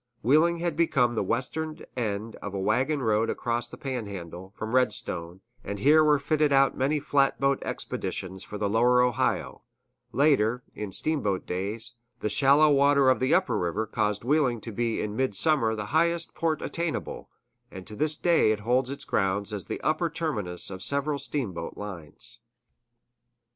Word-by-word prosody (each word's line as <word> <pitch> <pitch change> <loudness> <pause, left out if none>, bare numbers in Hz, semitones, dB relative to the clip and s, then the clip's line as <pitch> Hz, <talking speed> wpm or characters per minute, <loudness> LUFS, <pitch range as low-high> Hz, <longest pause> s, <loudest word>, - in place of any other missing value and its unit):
Wheeling 155 +8 +4
had 170 -2 -2
become 135 -7 +2
the 110 - 0
western 140 +9 -3
end 110 -2 -3
of 100 -1 -7
a - - -2
wagon 130 +9 +1
road 110 0 +2
across 120 0 -2
the - - -11
Panhandle, 100 -8 -6
from 110 +2 -5
Redstone, 95 -8 -1 0.2
and 100 - -5
here 150 +8 +5
were 150 -1 +4
fitted 150 +1 +1
out 135 -1 +4
many 145 +3 +1
flatboat 140 -1 +1
expeditions 95 0 -4
for 105 - -7
the 105 - -1
lower 120 +4 +4
Ohio; 125 -2 0 0.5
later, 125 -4 +2
in 105 -2 -6
steamboat 100 -3 -1
days, 105 +6 -3 0.3
the 105 - -1
shallow 140 +6 +5
water 140 -1 +5
of 130 - +1
the 130 +1 +3
upper 125 - +1
river 90 +6 -1
caused 105 -1 -1
Wheeling 130 -3 +2
to 115 - -6
be 115 +1 -1
in 105 0 -4
midsummer 130 0 +2
the 110 -1 -4
highest 170 +1 +1
port 160 -2 -1
attainable; 170 -1 -3 0.4
and 95 - -10
to 105 - -10
this 155 +5 0
day 170 -11 +3
it 105 -1 -2
holds 125 +4 +1
its 140 +1 -6
ground 100 +2 0
as 100 -5 -4
the - - -4
upper 155 +2 +1
terminus 110 - -3
of 95 -1 -7
several 140 +3 -1
steamboat 95 - -4
lines. 90 -8 -7
125 Hz, 165 wpm, -27 LUFS, 105-145 Hz, 0.5 s, here